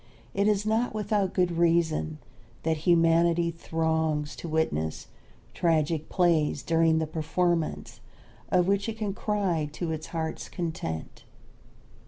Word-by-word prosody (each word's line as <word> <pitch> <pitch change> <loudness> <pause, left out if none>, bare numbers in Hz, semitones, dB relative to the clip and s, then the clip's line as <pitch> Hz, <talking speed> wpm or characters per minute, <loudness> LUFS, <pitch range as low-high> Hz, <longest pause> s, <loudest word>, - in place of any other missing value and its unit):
It 200 +1 +2
is 210 -1 +2
not 220 +1 0
without 205 -2 0
good 180 -1 +2
reason 165 -2 +2 0.5
that 160 0 +1
humanity 170 0 +4
throngs 160 -2 -1
to 170 - -6
witness 80 - -1 0.5
tragic 160 -2 +1
plays 165 -6 +2
during 165 -1 +3
the 160 - +1
performance 165 +1 -1 0.5
of 180 -1 +3
which 200 +2 +1
it 220 - -5
can 210 -3 -2
cry 190 -8 -1
to 165 +1 -3
its 160 0 -4
heart's 160 -1 -4
content. 160 - -5
165 Hz, 125 wpm, -27 LUFS, 160-180 Hz, 0.5 s, humanity